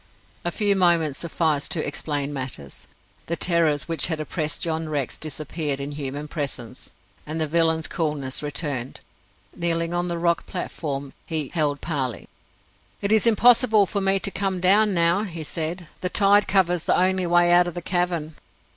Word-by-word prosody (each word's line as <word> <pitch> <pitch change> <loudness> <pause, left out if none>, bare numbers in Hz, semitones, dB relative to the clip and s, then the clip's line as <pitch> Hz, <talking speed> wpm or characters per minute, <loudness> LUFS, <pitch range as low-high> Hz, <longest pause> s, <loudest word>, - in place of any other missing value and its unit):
A 175 - -1
few 205 +1 +1
moments 170 -6 +2
sufficed 160 -3 0
to 160 - -1
explain 145 -1 -2
matters. 130 - -6 0.4
The 170 - -1
terrors 165 -5 +2
which 165 -5 +1
had 160 -2 -1
oppressed 155 0 -2
John 160 -1 -2
Rex 145 -4 -2
disappeared 150 -1 -3
in 140 +1 -4
human 145 0 -5
presence, 135 -6 -5 0.4
and 155 +2 -3
the 160 - +1
villain's 160 0 +1
coolness 150 -6 -2
returned. 145 -4 -3 0.5
Kneeling 170 0 -1
on 175 0 -1
the 170 -1 -3
rock 170 -2 0
platform, 140 -7 -5
he 155 -4 0
held 150 -4 0
parley. 135 - -3 0.7
"It 200 - -2
is 220 +1 +4
impossible 230 -1 +5
for 200 +2 -2
me 195 0 +3
to 200 - -1
come 190 -2 -1
down 200 +3 +4
now," 170 +3 +3
he 170 -6 -6
said. 165 +3 -3
"The 180 - -2
tide 205 +1 +4
covers 180 -4 +1
the - - +3
only 185 0 +2
way 175 0 +4
out 175 0 +5
of 175 - -6
the 175 - -4
cavern." 175 -3 -1
165 Hz, 165 wpm, -23 LUFS, 150-180 Hz, 0.7 s, impossible